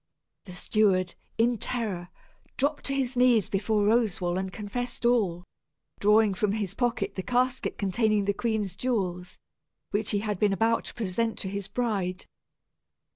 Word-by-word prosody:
The 180 -2 -10
steward, 185 -2 +2 0.2
in 230 0 +2
terror, 200 -9 -2 0.5
dropped 285 +1 0
upon 275 - 0
his 260 -1 -1
knees 245 -4 +4
before 210 +1 +1
Roswal 205 -6 +2
and 190 0 -3
confessed 240 +4 -4
all, 200 -8 +2 0.6
drawing 210 0 +4
from 200 +1 0
his 205 -3 -2
pocket 215 -4 -1
the 190 - -3
casket 250 +4 0
containing 210 +1 +1
the 200 - +1
queen's 210 -4 -1
jewels, 185 -7 -2 0.5
which 205 +1 0
he 205 -2 +1
had 210 -3 -2
been 205 -2 +3
about 225 +3 +1
to - - -7
present 225 +1 -1
to 190 - -4
his 200 0 -4
bride. 200 -5 -2
210 Hz, 150 wpm, -27 LUFS, 195-235 Hz, 0.6 s, knees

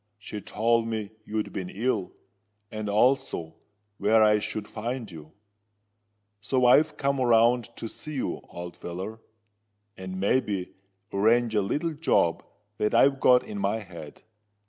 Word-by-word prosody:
She 105 0 -7
told 115 +3 +1
me 110 -2 -3
you'd 110 0 -3
been 90 -2 -4
ill, 110 -3 -1 0.6
and 110 -1 -4
also 115 -7 +1 0.5
where 110 +1 +4
I 105 0 +5
should 105 0 -4
find 115 0 -5
you. 80 -2 -11 1.1
So 130 +3 +1
I've 145 +5 +5
come 140 -1 0
round 120 0 +4
to 115 - -5
see 155 +6 -7
you, 130 - -3
old 85 0 -8
feller—and, 105 0 -10
may 100 +7 +3
be, 100 -7 -4 0.4
arrange 115 +3 +3
a 105 - +3
little 150 - -1
job 145 - +1 0.4
that 105 - +1
I've 135 0 +5
got 125 -1 +5
in 215 -2 -6
my 155 - 0
head. 85 -8 -10
110 Hz, 140 wpm, -27 LUFS, 100-125 Hz, 1.1 s, I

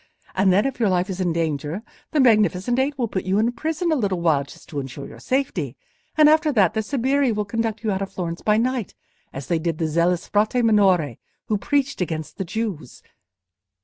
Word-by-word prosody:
And 190 0 +3
then 200 +6 +3
if 270 -2 -3
your 220 -4 +3
life 185 +1 +1
is 190 0 -4
in 175 -2 +1
danger, 160 +3 -2 0.3
the 305 - 0
Magnificent 220 -1 +3
Eight 280 +2 0
will 240 -3 0
put 190 -3 -3
you 190 +1 0
in 225 +3 +2
prison 320 +5 -2
a - - +3
little 200 - 0
while 160 -5 +2
just 140 - -15
to 145 - -4
insure 135 0 -7
your - - -11
safety, 190 - -2 0.4
and 305 -1 +7
after 310 0 +4
that, 195 -8 +3
their 220 - 0
sbirri 270 +3 +1
will 210 -1 -1
conduct 225 +1 -2
you 215 - 0
out 190 0 -2
of 195 - -4
Florence 170 -2 -4
by 210 0 +2
night, 245 -2 -1 0.4
as 135 0 -7
they 165 +4 0
did 165 -1 -2
the 160 - 0
zealous 170 +2 +1
Frate 215 +4 +2
Minore 185 - +3 0.3
who 215 - +2
preached 280 -1 0
against 155 -3 -4
the 195 - -3
Jews. 185 - -5
205 Hz, 215 wpm, -23 LUFS, 170-245 Hz, 0.4 s, and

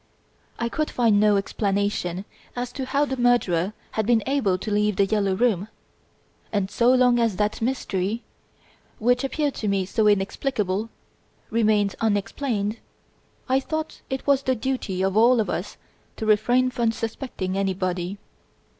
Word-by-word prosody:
I 235 - -1
could 305 +6 -2
find 225 -4 +3
no 210 -1 +4
explanation 195 -2 -1 0.3
as 245 0 -3
to 265 0 -5
how 285 +2 +2
the 265 -2 -4
murderer 215 -7 +2 0.2
had 220 -1 -1
been 230 -3 +3
able 260 -9 +1
to 210 +3 -5
leave 210 0 +2
"The 200 - +3
Yellow 200 -2 +1
Room"; 210 -3 +1 0.8
and 200 -2 -1
so 240 +1 +3
long 250 -1 +4
as 230 -4 +1
that 210 +3 -1
mystery, 225 -3 -1 0.7
which 245 +4 +2
appeared 285 +1 -1
to 215 - -4
me 195 -2 +1
so 210 +3 +1
inexplicable, 205 0 0 0.6
remained 215 -3 +2
unexplained, 210 +1 -1 0.7
I 260 +1 +3
thought 315 +3 -4
it 265 0 -3
was 280 -1 +3
the 260 -1 0
duty 220 -6 -2
of 190 0 0
all 235 +3 +5
of 215 - 0
us - - -4 0.4
to 220 - -4
refrain 245 +4 +3
from 235 -2 +1
suspecting 225 -4 -4
anybody. 185 -1 -1
220 Hz, 150 wpm, -24 LUFS, 200-245 Hz, 0.8 s, all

